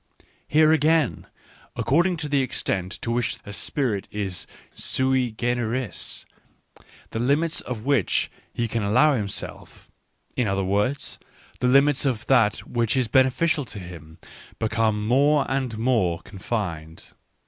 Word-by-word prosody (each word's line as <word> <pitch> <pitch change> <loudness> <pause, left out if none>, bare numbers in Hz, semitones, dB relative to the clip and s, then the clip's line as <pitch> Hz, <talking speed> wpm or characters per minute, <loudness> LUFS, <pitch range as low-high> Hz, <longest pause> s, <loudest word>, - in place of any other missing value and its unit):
Here, 155 +1 +5
again, 155 - +2 0.5
according 170 +7 +2
to 155 -2 -4
the 140 -1 +2
extent 95 -7 -2
to 115 - -1
which 115 -2 0
a 100 - -7
spirit 110 -3 -1
is 100 -3 -3 0.3
sui 130 -1 +1
generis, 120 +1 -2 0.9
the 110 - -3
limits 150 +7 +1
of 120 -4 -6
that - - -13
which 115 -10 +1 0.2
he 120 - -2
can 115 0 -2
allow 110 +10 +4
himself 100 -4 -6 0.2
— - - -42
in 125 - +1
other 95 0 0
words, 105 +9 -1 0.4
the 125 - +1
limits 140 +1 +4
of 120 -3 -1
that 115 -6 +2
which 120 +1 0
is 125 -3 +2
beneficial 135 +6 +3
to 110 - -9
him 85 -4 -10 0.2
— - - -20
become 110 -1 0
more 140 +5 +3
and 130 -4 -2
more 110 -8 +1
confined. 90 -6 -5
120 Hz, 140 wpm, -24 LUFS, 105-135 Hz, 0.9 s, Here